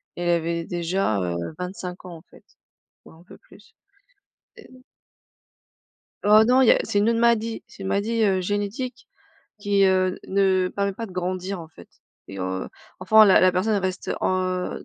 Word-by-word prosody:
Elle 175 0 -2
avait 170 0 -1
déjà, 175 - -1
heu, 85 -1 -2 0.2
25 180 0 -7
ans 175 -2 -9
en - - -16
fait, - - -20 0.6
ou - - -15
un 165 +2 -18
peu - - -15
plus. - - -21 0.8
Et - - -14
heu 255 0 -18 1.4
Oh 210 +1 +6
non 255 +2 +4
il 245 - +4
y - - +8
a - - +3
c'est 205 - -1
une 215 +3 +2
autre 230 - 0
maladie. 230 -1 +1
C'est 195 - -13
une 190 - -4
maladie, 220 +4 0
heu, 190 -2 +2
génétique 205 +6 -4 0.5
qui, 200 -1 +2
heu, 185 -1 +1
ne 190 -1 +1
permet 200 0 -1
pas 225 +3 -6
de 185 - -13
grandir 185 +1 -4
en 165 - -10
fait 90 - -16 0.4
et 95 - -9
heu, 95 0 -4 0.3
enfin 220 0 +6
la 195 - +5
la 185 - +5
personne 185 +4 0
elle 200 - -1
reste, 185 0 -4
heu, 185 -1 -2
190 Hz, 185 wpm, -23 LUFS, 180-205 Hz, 1.4 s, y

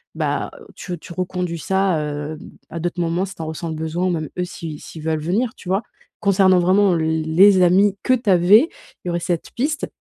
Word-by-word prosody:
bah, - - -1 0.3
tu 180 -2 -6
tu 170 - -10
reconduis 180 -1 -3
ça, 190 -1 +1
heu, 150 +1 -4 0.3
à 170 - -6
d'autres 175 +2 -3
moments 170 +1 0
si 195 0 -10
tu - - -8
en - - -4
ressens 160 +1 -5
le 160 - -4
besoin 160 +3 -2
ou - - +1
même 160 -4 -2
eux 180 - 0
si 165 -4 -7
si - - -11
ils - - -8
veulent 160 0 -1
venir, 215 +9 0
tu 180 - -10
vois? 195 +4 +1 0.4
Concernant 190 -2 +4
vraiment 190 +2 +3
l 160 0 0
les 185 +5 +5
amis 190 +3 +4
que 255 - +3
tu 240 -4 0
avais, 195 - +6 0.4
il - - -5
y - - 0
aurait 170 0 -1
cette 170 -1 -3
piste. 295 +5 -1
180 Hz, 230 wpm, -20 LUFS, 160-195 Hz, 0.4 s, avais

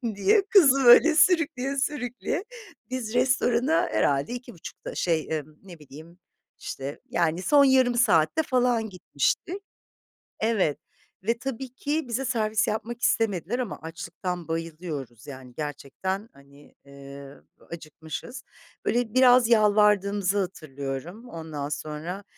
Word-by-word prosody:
diye 405 - +3
kızı, 275 -9 +5
böyle, 305 +7 +8
sürükleye 300 -6 +2
sürükleye. 270 - -2 0.5
Biz 240 -3 -4
restorana 255 +3 +2
herhâlde 140 - +1
2.30'da 245 -8 -9
şey, 165 -3 0
ımm, 150 +1 -15
ne 175 -4 -13
bileyim, 155 +4 -14 0.4
işte, 135 +2 -6
yani, 170 +2 0
son 285 +8 +5
yarım 260 -2 +4
saatte 235 - +3
falan 245 -5 +1
gitmiştik. 195 - -2 0.8
Evet 205 -10 +1 0.5
ve 235 - +2
tabii 265 +1 -5
ki 295 +3 -2
bize 245 +3 -2
servis 220 -4 0
yapmak 230 +2 -4
istemediler 225 -1 0
ama 240 -6 -4
açlıktan 170 +1 -6
bayılıyoruz, 160 -7 -6
yani, 130 -3 -10
gerçekten, 155 - -5
hani, 140 +1 -19
eee, 140 0 -11 0.4
acıkmışız. 165 - -8 0.4
Böyle, 235 -2 0
biraz 250 -2 +5
yalvardığımızı 205 -3 +3
hatırlıyorum. 160 - -6
Ondan 155 -3 -6
sonra, 155 +6 -5
205 Hz, 115 wpm, -26 LUFS, 155-250 Hz, 0.8 s, böyle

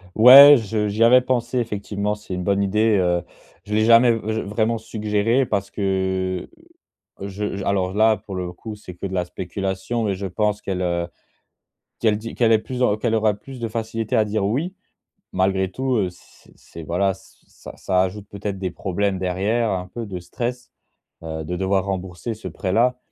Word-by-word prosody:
Ouais, 135 +6 +10
je 110 -2 -2
j'y 105 +2 +1
avais 125 +2 +7
pensé 125 -1 -1
effectivement, 105 -2 -2
c'est 105 -2 -9
une 90 0 -3
bonne 100 +2 +1
idée, 105 +2 +2
heu, 90 -2 +1 0.4
je 105 - -5
l'ai 110 +1 +3
jamais, 115 +1 +6
heu, 115 - +1 0.3
vr - - -9
vraiment 110 +2 0
suggéré 110 +3 0
parce 100 -4 -2
que, 95 -2 -1 0.7
je 100 0 -4
alors, 95 -2 0
là, 110 +1 +4
pour 100 - -9
le 90 -1 -4
coup, 110 +4 -8
c'est 95 -4 -11
que 90 - -7
de 95 - -8
la 90 -1 0
spéculation 95 +6 -3
mais 100 -3 0
je 95 +1 -4
pense 105 +2 -1
qu'elle, 95 -3 -3
heu, 85 -1 -1 0.9
qu'elle 110 -3 +2
dit 115 +1 -7
qu'elle 115 -2 +3
est 110 - +5
plus 125 +4 -6
dans 105 -5 +3
qu'elle 115 +1 -1
aura 110 -1 +2
plus 130 +5 -11
de 115 - -2
facilité 115 +1 -3
à 110 - +4
dire: 105 -1 -1
«Oui» 150 - -2 0.6
malgré 95 0 +1
tout, 130 +4 -1
heu, 95 -5 0
c 90 - -21
c'est, 85 - -12
voilà, 95 +4 0
ce 95 - -20
ça - - -12
ça 90 -1 +1
ajoute 100 +2 -4
peut-être 100 -1 -5
des 95 -1 -3
problèmes 95 +2 -2
derrière, 100 +6 0
un 90 -1 -3
peu 115 +5 -6
de 95 -3 -6
stress, 120 +7 -5 0.5
heu, 80 -1 -5
de 90 +3 -4
devoir 95 +1 0
rembourser 95 +3 -4
ce 110 - -11
prêt-là 115 +6 0
105 Hz, 190 wpm, -22 LUFS, 95-115 Hz, 0.9 s, Ouais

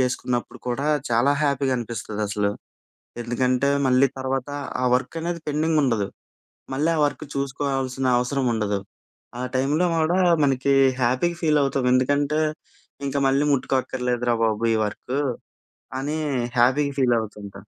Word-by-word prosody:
చేసుకున్నప్పుడు 125 -1 -1
కూడా, 135 +4 -1 0.2
చాలా 120 +5 +3
హ్యాపీగా 140 -2 +1
అనిపిస్తుంది 110 -2 -5
అసలు. 100 0 0 0.7
ఎందుకంటే, 125 +3 +1 0.2
మళ్ళీ 130 +2 +4
తర్వాత 130 +1 -2 0.3
ఆ - - +2
వర్క్ 135 - -5
అనేది 170 -1 -3
పెండింగుండదు. 145 -9 +1 0.7
మళ్ళీ 150 +5 +1
ఆ - - 0
వర్క్ 145 - -3
చూసుకోవాల్సిన 135 -1 -2
అవసరం 130 +2 0
ఉండదు, 105 -2 -1 0.6
ఆ - - -3
టైంలో 145 +7 +2
కూడా 165 +3 +2 0.2
మనకి 135 0 +2 0.3
హ్యాపీగా 130 +8 +1
ఫీలవుతాం 140 -4 +2
ఎందుకంటే, 145 +4 +2 0.7
ఇంక 135 - -4
మళ్ళీ 140 +2 +2
ముట్టుకోక్కర్లేదురా 125 -2 0
బాబు 110 +1 +1
ఈ - - +2
వర్కు, 125 +6 -4 0.8
అని 150 +3 -2 0.4
హ్యాపీగా 140 +4 +3
ఫీలవుతుంటాం. 110 -5 -1
130 Hz, 120 wpm, -23 LUFS, 120-145 Hz, 0.8 s, మళ్ళీ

